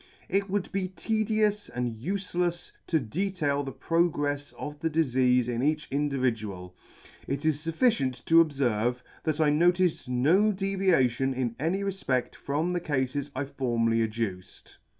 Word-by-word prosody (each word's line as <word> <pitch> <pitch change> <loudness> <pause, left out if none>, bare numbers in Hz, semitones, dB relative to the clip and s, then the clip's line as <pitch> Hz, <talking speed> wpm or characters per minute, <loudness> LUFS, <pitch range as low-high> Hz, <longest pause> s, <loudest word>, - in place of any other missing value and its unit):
It 195 +1 0
would 200 -1 -1
be 195 -1 -1
tedious 215 +1 0
and 120 -2 -3
ufelefs 175 - -2 0.2
to 160 - +2
detail 150 - -1
the 135 -1 -5
progrefs 145 -3 0
of 150 0 -6
the 165 - 0
difeafe 130 -5 +2
in 120 -1 -1
each 150 +2 0
individual 115 -10 -2 0.3
— - - -21
it 140 +2 -3
is 155 -2 +2
fufficient 160 - +1
to 165 0 +7
obferve, 125 -5 0 0.2
that 155 -1 0
I 155 -2 +4
noticed 175 -2 +2
no 160 +13 +3
deviation 180 - +1
in 120 -3 -2
any 175 +7 0
refpeit 160 -11 -1
from 155 +6 -1
the 175 - 0
Cafes 140 -2 -1
I 135 +2 -1
formerly 115 -4 0
adduced. 110 -5 -4
145 Hz, 145 wpm, -28 LUFS, 125-180 Hz, 0.3 s, to